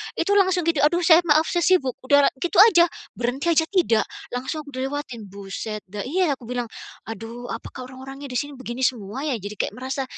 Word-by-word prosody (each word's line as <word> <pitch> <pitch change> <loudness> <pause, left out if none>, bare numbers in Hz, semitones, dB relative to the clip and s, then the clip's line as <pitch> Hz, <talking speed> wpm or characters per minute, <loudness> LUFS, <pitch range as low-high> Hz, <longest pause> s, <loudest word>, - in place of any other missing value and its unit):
Itu 405 0 +1
langsung 370 -2 +2
gitu, 325 -4 +2
"Aduh 345 +4 +3
saya 325 0 +7
maaf, 310 +2 +4
saya 345 -2 +1
sibuk." 280 -9 +3
Udah 285 +1 +5
gitu 350 +3 +1
aja, 350 -6 +6 0.3
berhenti 260 +7 -1
aja 320 0 +4
tidak, 335 - +2 0.3
langsung 260 +5 -3
dilewatin, 265 -1 -4
buset, 200 +2 -6
nggak 205 0 -5
iya 335 -2 +1
aku - - -17
bilang, 245 -1 -3 0.4
"Aduh 225 +2 -7
apakah 255 -1 -7
orang-orangnya 270 +2 -9
di 250 - -1
sini 290 0 -5
begini 255 +1 -5
semua 230 +2 -2
ya?" 285 - 0
Jadi 205 +2 -7
kayak - - -2
merasa 265 +2 -3
270 Hz, 190 wpm, -23 LUFS, 240-320 Hz, 0.4 s, saya